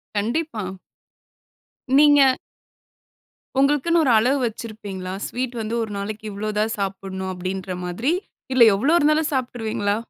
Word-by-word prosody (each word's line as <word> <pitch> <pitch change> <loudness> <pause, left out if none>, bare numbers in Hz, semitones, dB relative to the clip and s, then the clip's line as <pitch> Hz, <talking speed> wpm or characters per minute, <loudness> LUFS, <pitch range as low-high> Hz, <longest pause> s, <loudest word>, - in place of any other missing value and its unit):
கண்டிப்பா. 230 +2 -1 1.3
நீங்க 290 0 +7 1.4
உங்களுக்குன்னு 295 +4 +3
ஒரு 255 - +3
அளவு 255 +6 +3
வச்சிருப்பீங்களா? 205 -5 -7
"ஸ்வீட் 250 0 -4
வந்து 220 +1 -4
ஒரு 220 - -6
நாளைக்கு 210 +2 -5
இவ்ளோ 210 +2 -4
தான் 220 +1 +1
சாப்பிட்ணும்," 190 -1 -4
அப்பிடின்ற 185 0 -4
மாதிரி. 225 - -1 0.4
இல்ல 255 - +7
எவ்ளோ 275 +11 +2
இருந்தாலும் 305 +1 +2
சாப்பிட்டுருவீங்களா? 225 -5 -1
220 Hz, 115 wpm, -22 LUFS, 195-270 Hz, 1.4 s, நீங்க